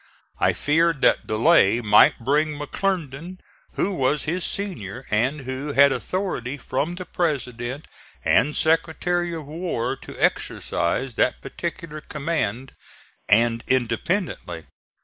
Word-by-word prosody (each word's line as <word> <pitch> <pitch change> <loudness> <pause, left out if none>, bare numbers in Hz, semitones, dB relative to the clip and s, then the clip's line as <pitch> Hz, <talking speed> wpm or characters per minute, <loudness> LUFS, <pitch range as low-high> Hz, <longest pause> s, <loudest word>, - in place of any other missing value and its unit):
I - - +3
feared 160 0 +1
that - - +3
delay 115 - +4
might 105 -3 +5
bring 150 +5 0
McClernand, 170 +1 -3 0.4
who 200 - 0
was 140 -2 +1
his 170 +3 -2
senior 130 - -5
and 130 +8 +1
who 130 +3 -4
had 140 0 +6
authority 145 -8 -3
from 145 +6 -2
the 185 0 -7
President 135 -5 -3 0.4
and 110 - +3
Secretary 170 +2 +1
of 160 -3 -7
War 155 -5 -3
to - - -11
exercise 125 +9 0
that - - +2
particular 165 +2 -6
command, 140 -6 -3 0.6
and 115 +1 +3
independently. 120 - -1
145 Hz, 115 wpm, -23 LUFS, 120-170 Hz, 0.6 s, had